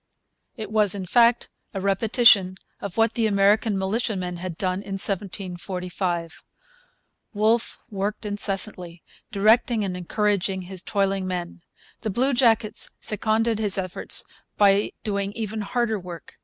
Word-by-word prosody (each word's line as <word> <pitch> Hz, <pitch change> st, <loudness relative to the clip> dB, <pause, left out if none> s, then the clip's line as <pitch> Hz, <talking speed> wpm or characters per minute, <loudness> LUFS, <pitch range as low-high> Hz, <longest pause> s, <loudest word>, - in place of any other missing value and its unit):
It 215 Hz, -2 st, -6 dB
was, 210 Hz, -3 st, +3 dB
in 190 Hz, -2 st, -5 dB
fact, 235 Hz, +5 st, +3 dB, 0.2 s
a -, -, -1 dB
repetition 200 Hz, -1 st, +4 dB, 0.2 s
of 200 Hz, 0 st, -7 dB
what 225 Hz, 0 st, +3 dB
the 230 Hz, -2 st, +1 dB
American 205 Hz, +1 st, +3 dB
militiamen 190 Hz, -2 st, -2 dB
had 175 Hz, -2 st, -6 dB
done 185 Hz, +1 st, -1 dB
in 195 Hz, -, -7 dB
1745. 180 Hz, -3 st, -3 dB, 0.9 s
Wolfe 220 Hz, +3 st, +1 dB
worked 205 Hz, +2 st, -3 dB
incessantly, 195 Hz, -4 st, -3 dB, 0.3 s
directing 220 Hz, +2 st, +3 dB
and 190 Hz, -2 st, -3 dB
encouraging 190 Hz, 0 st, -1 dB
his 185 Hz, 0 st, -6 dB
toiling 195 Hz, -1 st, -1 dB
men. 175 Hz, -1 st, -5 dB, 0.4 s
The 220 Hz, -, -2 dB
bluejackets 240 Hz, -1 st, +1 dB
seconded 220 Hz, +1 st, 0 dB
his 205 Hz, -3 st, +4 dB
efforts 185 Hz, -1 st, 0 dB, 0.3 s
by 200 Hz, 0 st, +4 dB
doing 200 Hz, -1 st, -2 dB
even 220 Hz, -1 st, -4 dB
harder 220 Hz, +1 st, -1 dB
work. 175 Hz, -4 st, -10 dB
200 Hz, 125 wpm, -24 LUFS, 185-220 Hz, 0.9 s, repetition